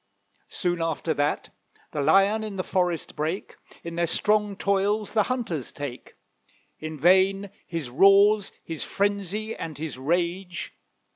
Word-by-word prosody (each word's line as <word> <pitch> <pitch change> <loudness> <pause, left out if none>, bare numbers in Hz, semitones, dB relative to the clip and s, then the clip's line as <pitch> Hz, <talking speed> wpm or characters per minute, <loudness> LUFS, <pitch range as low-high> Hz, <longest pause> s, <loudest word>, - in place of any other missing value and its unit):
Soon 175 -1 -1
after 165 0 -1
that 145 0 -1 0.4
The 150 - -2
Lion 195 +8 +4
in 215 -2 -5
the 185 - -2
forest 180 -4 -1
brake, 160 +6 -3 0.3
In 170 - -6
their 170 0 +2
strong 210 +3 +1
toils 200 +2 0
the 220 - +4
hunters 220 - -2
take; 140 -4 -7 0.6
In 155 -1 -6
vain 190 +4 +4 0.2
his 160 -7 -4
roars, 195 +6 +5
his 165 -2 -4
frenzy, 205 +2 -1
and 155 -4 -6
his 150 -4 -5
rage. 175 +5 -2
180 Hz, 135 wpm, -26 LUFS, 160-200 Hz, 0.6 s, roars